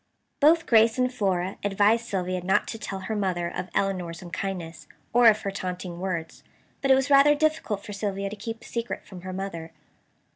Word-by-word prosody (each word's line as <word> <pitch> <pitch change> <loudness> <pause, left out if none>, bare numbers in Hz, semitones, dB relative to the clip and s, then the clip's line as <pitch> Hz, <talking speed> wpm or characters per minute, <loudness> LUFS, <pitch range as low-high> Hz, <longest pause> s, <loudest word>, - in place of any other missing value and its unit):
Both 325 +3 +5
Grace 225 0 +5
and 255 0 +1
Flora 190 -4 -1
advised 205 +3 +2
Sylvia 185 -2 -2
not 190 +2 +2
to 225 - -5
tell 195 -2 -5
her 215 +4 -3
mother 185 -4 -1
of 185 - -4
Elinor's 180 -3 -1
unkindness, 175 -1 -5 0.3
or 240 0 +6
of 215 -1 +5
her 195 - -2
taunting 180 -2 -5
words. 175 -3 -4 0.4
But 275 - 0
it 265 - +8
was 270 +2 0
rather 280 +1 +7
difficult 295 -10 0
for 205 - -7
Sylvia 195 -1 -3
to - - -5
keep 225 +2 -6
a - - -14
secret 235 0 -4
from 185 -3 -11
her 185 +1 -6
mother. 185 -4 -6
195 Hz, 190 wpm, -26 LUFS, 185-230 Hz, 0.4 s, it